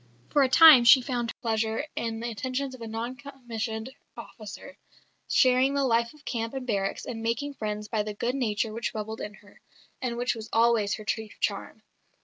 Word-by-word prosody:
For 290 - +4
a 265 - +4
time 310 -3 +9
she 250 +3 +8
found 245 -2 -3
her - - -7
pleasure 225 +2 0
in 225 -1 -3
the 235 0 -3
attentions 260 +5 -3
of 255 - -11
a 230 - -6
non 230 +3 -4
commissioned 240 -3 -6 0.3
officer, 220 +5 -10 0.5
sharing 255 +1 +4
the 280 - +1
life 235 -2 +2
of 295 - -21
camp 230 +1 -3
and 265 -1 -4
barracks 195 -4 -2
and 225 -2 -5
making 235 +6 -2
friends 210 -4 -4
by 215 0 -1
the 210 0 -5
good 240 +4 -1
nature 225 -4 -1
which 230 +1 -3
bubbled 220 +1 -5
in 210 0 -6
her, 205 -1 -20 0.4
and 240 -2 -2
which 245 +1 0
was 225 -2 -8
always 225 -3 +3
her 215 - -10
chief 220 +1 -4
charm. - - -3
230 Hz, 195 wpm, -27 LUFS, 220-255 Hz, 0.5 s, time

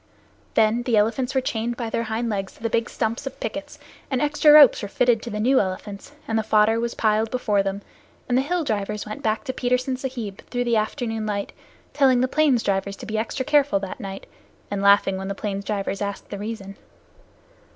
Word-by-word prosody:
Then 220 +2 +3
the 240 -2 +1
elephants 230 +5 +1
were 265 - +3
chained 235 -1 -2
by 230 -3 -4
their 230 - -1
hind 225 +2 -2
legs 195 -3 -3
to - - -21
their 230 - -1
big 230 +1 0
stumps 230 +3 -2
of 270 - -7
pickets, - - -5 0.3
and 265 -3 0
extra 295 +1 +4
ropes 295 -3 +8
were 205 - -4
fitted 235 +2 +2
to 240 - -6
the 210 -1 -4
new 260 +5 +4
elephants, 200 +3 -4 0.2
and 225 0 +1
the - - +2
fodder 220 +1 +3
was 235 0 -2
piled 220 0 +1
before 215 -5 +1
them, 195 +1 -3 0.4
and 245 - +1
the 260 - +4
hill 340 +5 -1
drivers 210 -4 -2
went 215 0 -7
back 215 0 0
to 260 - -4
Petersen 255 +1 0
Sahib 245 -7 -5
through 245 0 -1
the 240 -1 +1
afternoon 220 0 -2
light, 200 -1 -3 0.4
telling 265 -4 +4
the 255 - +2
plains 280 -4 +2
drivers 195 0 -1
to - - -10
be 220 0 -2
extra 255 +4 -3
careful 290 -6 +3
that 195 -1 -6
night, 195 0 -7 0.5
and 200 -1 -2
laughing 200 -1 +4
when 190 0 -5
the 200 - -3
plains 200 -1 -4
drivers 195 -1 -2
asked 200 -1 -5
the 200 - -5
reason. 205 -2 -6
225 Hz, 215 wpm, -23 LUFS, 205-250 Hz, 0.5 s, ropes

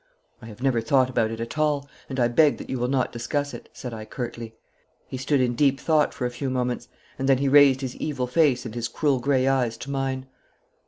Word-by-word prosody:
'I 115 - -10
have 115 +3 -10
never 130 -4 +2
thought 130 +2 +2
about 115 -3 +1
it 115 0 -6
at 115 +6 -5
all, 145 -2 +1 0.2
and 135 -1 -4
I 120 - +4
beg 145 +5 +4
that - - -8
you 130 - -2
will 125 - 0
not 130 -1 0
discuss 145 +5 -2
it,' - - -10
said 125 -2 -7
I 110 -1 -6
curtly. 115 -1 -6 0.5
He - - -6
stood 135 +2 0
in 125 -1 +1
deep 140 +1 +2
thought 155 -2 +2
for 125 - -4
a 125 - -1
few 130 +2 -4
moments, 125 -1 -2 0.3
and 135 +1 0
then 135 - +5
he 140 +2 0
raised 140 -1 +6
his 130 -2 -4
evil 140 -5 -2
face 130 -1 +2
and 115 - -6
his 120 -1 -2
cruel 140 -4 0
grey 130 0 +1
eyes 125 -4 +1
to 140 - -7
mine. 135 -1 -2
130 Hz, 235 wpm, -25 LUFS, 120-140 Hz, 0.5 s, raised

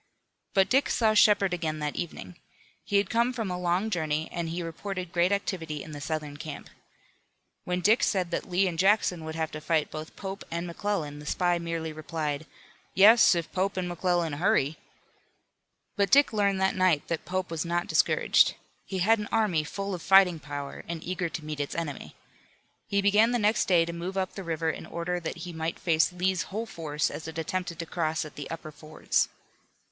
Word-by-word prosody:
But 195 -1 +5
Dick 270 +3 +2
saw 220 -2 +3
Shepard 205 -3 +5
again 160 -3 -2
that 150 -1 -3
evening. 95 - -6 0.5
He 205 - +1
had 200 -1 +1
come 235 +2 +2
from 225 -6 -3
a 180 - -3
long 180 +5 0
journey 155 -3 -1
and 170 -1 -3
he 170 +1 -3
reported 180 +2 -5
great 175 +2 +2
activity 165 -7 -2
in 160 - -10
the 145 -1 -7
Southern 150 -1 -4
camp. 150 -1 -8 0.9
When 180 0 -1
Dick 215 +6 +4
said 185 -4 +1
that 170 - -3
Lee 185 +2 +2
and 165 -3 -4
Jackson 190 -3 +3
would 160 0 -6
have 160 -1 -2
to 155 - -7
fight 155 -1 0
both 155 +1 -7
Pope 195 0 -6
and 170 +1 -3
McClellan 170 -5 -3
the 150 - -10
spy 175 +1 +1
merely 165 -1 -3
replied: 155 -1 -4 0.5
"Yes, 210 +1 +7
if 170 -1 -3
Pope 190 +1 -1
and 180 -1 -1
McClellan 175 -2 0
hurry." 150 -2 +2 1.2
But 200 -2 +2
Dick 280 -2 +5
learned 200 -2 +2
that 190 - +2
night 185 -6 +2
that 165 -2 -2
Pope 185 -1 -3
was 165 -2 -2
not 175 0 -1
discouraged. - - +3 0.3
He 190 - -3
had 225 +1 +4
an 210 - -5
army 200 -9 +2
full 195 +5 -4
of 175 - -5
fighting 185 -2 +5
power, 145 -1 -6
and 165 -1 -5
eager 180 -1 -2
to 160 -1 -6
meet 150 -1 -5
its 145 - -3
enemy. 155 -5 -5 0.7
He 200 0 +1
began 210 +4 +4
the - - +3
next 215 0 +2
day 175 -3 +4
to 170 - -5
move 175 +3 -5
up 190 -1 -1
the 195 - -6
river 165 -1 -1
in - - -9
order 175 +1 -3
that 165 - -5
he 175 - -7
might 160 +1 -3
face 160 -1 +2
Lee's 180 0 0
whole 220 +4 -3
force 150 -7 -2
as 155 - -7
it 160 - -7
attempted 170 +1 -3
to 165 - -4
cross 160 -1 -1
at 150 - -10
the 145 - -7
upper 160 -1 -6
fords. 155 +1 -1
175 Hz, 200 wpm, -28 LUFS, 160-195 Hz, 1.2 s, Yes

